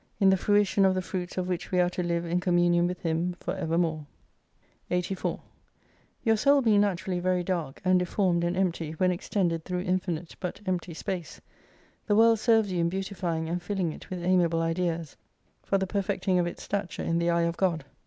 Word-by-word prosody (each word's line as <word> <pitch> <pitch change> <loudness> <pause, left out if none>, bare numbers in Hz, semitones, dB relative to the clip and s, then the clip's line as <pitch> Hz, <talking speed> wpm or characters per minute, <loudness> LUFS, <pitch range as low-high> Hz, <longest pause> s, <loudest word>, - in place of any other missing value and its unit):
In 195 -2 +5
the - - +5
fruition 200 0 +2
of 190 -1 +4
the 185 - 0
fruits 180 -1 -5
of 180 -1 -1
which 180 -2 -3
we 180 - +2
are 180 0 +3
to 180 - -3
live 170 -1 -1
in 170 +1 0
communion 175 -1 +3
with 180 0 -4
Him 165 +2 0
for 180 - -3
evermore. 165 -4 -1 0.8
84* 180 +1 -1 0.8
Your 225 -2 +4
soul 280 +4 +4
being 210 -3 +4
naturally 185 -2 -1
very 180 0 +1
dark, 170 -7 -3
and 185 0 +4
deformed 180 -1 +1
and 175 +1 -1
empty 170 -4 -1
when 180 +3 +2
extended 175 -2 -1
through 180 0 -3
infinite 180 -2 -2
but 180 - -4
empty 180 -3 -2
space, 175 -1 -5 0.7
the 205 - +3
world 225 0 +5
serves 220 -3 +3
you 180 - -1
in 170 0 +2
beautifying 180 -3 -3
and 175 +2 -2
filling 180 -2 -1
it - - -12
with 180 -2 -5
amiable 175 -2 +2
ideas; 165 -2 -2 0.5
for 195 - 0
the 190 - 0
perfecting 195 -1 0
of 175 - +1
its 175 - -7
stature 200 -3 -3
in 165 0 0
the 170 0 +1
eye 170 0 +2
of 170 0 0
God. 170 -6 0
180 Hz, 195 wpm, -28 LUFS, 170-190 Hz, 0.8 s, In